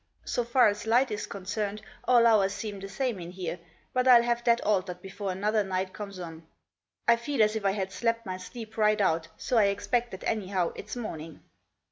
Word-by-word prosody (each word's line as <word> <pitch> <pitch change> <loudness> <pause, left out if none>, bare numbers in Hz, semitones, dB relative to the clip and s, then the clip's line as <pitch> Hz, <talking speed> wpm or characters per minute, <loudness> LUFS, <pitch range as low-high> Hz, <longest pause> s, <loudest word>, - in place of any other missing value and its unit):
So 245 - 0
far 240 +2 +4
as 210 +1 -2
light 245 +2 +3
is 210 0 -3
concerned 205 +2 -4 0.2
all 240 -2 +5
hours 205 -4 +4
seem 210 -3 -5
the 195 0 -7
same 240 0 -2
in 170 -1 -7
here, 180 -1 -5 0.3
but 255 - +3
Til 240 -2 +8
have 240 0 0
that 235 -1 +4
altered 185 -3 0
before 195 +1 -5
another 210 +3 +1
night 185 -1 -2
comes 200 -2 -7
on. 165 -2 -8 0.6
I 235 - +7
feel 235 0 +1
as 215 +1 +2
if 220 - -2
I 195 - +3
had 190 -2 -3
slept 230 +3 -1
my 185 -1 -4
sleep 220 +4 -9
right 215 -1 +3
out, 165 -5 +1
so 245 - +1
I 210 - +5
expect 230 +5 0
that 190 - -9
anyhow 190 -5 0
it's - - -7
morning." 165 -10 -6
210 Hz, 205 wpm, -28 LUFS, 190-230 Hz, 0.6 s, Til